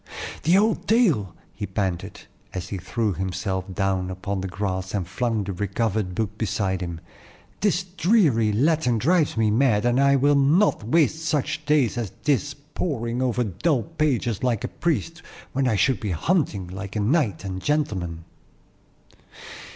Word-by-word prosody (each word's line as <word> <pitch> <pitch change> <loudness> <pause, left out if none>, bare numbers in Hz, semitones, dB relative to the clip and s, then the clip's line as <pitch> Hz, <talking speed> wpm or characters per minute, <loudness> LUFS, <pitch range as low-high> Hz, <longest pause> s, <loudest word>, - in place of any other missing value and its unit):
"The 170 +4 +4
old 215 +2 +1
tale," 180 - +2 0.2
he 105 - -5
panted, 95 -2 -3 0.3
as 90 0 -4
he 95 - -4
threw 110 +2 -1
himself 95 +1 -3
down 95 -1 -1
upon 95 +1 -3
the 95 - -3
grass 95 0 -3
and 95 -4 -2
flung 115 +2 -1
the 100 0 -4
recovered 100 0 -1
book 105 0 -3
beside 95 -4 -1
him. 85 -2 -5 0.6
"This 195 -3 +1
dreary 175 - +2
Latin 130 +1 +2
drives 155 +3 +2
me 110 -1 +3
mad, 115 -2 +3
and 120 +1 +3
I 140 0 +5
will 140 +2 +4
not 145 - +3
waste 160 +6 +2
such 155 0 -1
days 140 -6 +2
as 110 -5 -4
this 145 -1 +1
poring 140 -5 -3
over 125 -1 +1
dull 120 - 0
pages 140 -9 -1
like 120 -5 0
a - - -1
priest, 140 - -2 0.3
when 135 0 +1
I 115 - +2
should 100 +4 +2
be 105 - -3
hunting 100 - 0
like 95 +2 -7
a - - 0
knight 105 - +1
and 95 -1 -4
gentleman." 95 - -1
115 Hz, 160 wpm, -24 LUFS, 95-145 Hz, 0.6 s, I